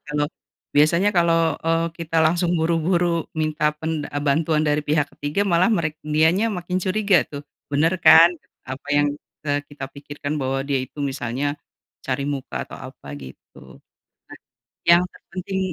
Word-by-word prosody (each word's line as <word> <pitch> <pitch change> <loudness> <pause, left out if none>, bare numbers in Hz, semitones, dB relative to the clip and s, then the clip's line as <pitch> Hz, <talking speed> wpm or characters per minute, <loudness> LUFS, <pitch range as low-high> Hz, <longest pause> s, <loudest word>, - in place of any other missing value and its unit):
kalo 150 0 0 0.5
biasanya 170 +7 +4
kalo, 170 -1 +4 0.3
eee, 165 0 +1
kita 165 -1 -4
langsung 170 +2 +2
buru-buru 170 +1 +1
minta 155 -1 +1
pen 160 0 -3
eee, 145 0 -4
bantuan 155 +2 +2
dari 150 0 +2
pihak 150 0 +1
ketiga 150 +8 -1
malah 175 +2 +3
merek 155 -7 -1
dianya 160 +8 +2
makin 180 -1 -3
curiga 195 -3 +3
tuh, 145 0 -8 0.3
"Bener 160 +5 +2
kan! 170 +1 +8 0.3
Apa 130 +2 -8
yang 145 0 +3 0.4
telah 145 0 0
kita 145 -2 -9
pikirkan 145 +1 -6
bahwa 135 0 -1
dia 140 -2 0
itu," 140 - -11
misalnya, 135 +1 -2 0.5
"cari 135 +1 -2
muka 140 -2 -4
atau - - -10 0.2
apa". 70 - -12
Gitu. 65 -2 -10 0.9
Nah. - - -11 0.5
Yang 170 +1 +7
terpenting 190 +1 -6
155 Hz, 150 wpm, -22 LUFS, 145-170 Hz, 0.9 s, kan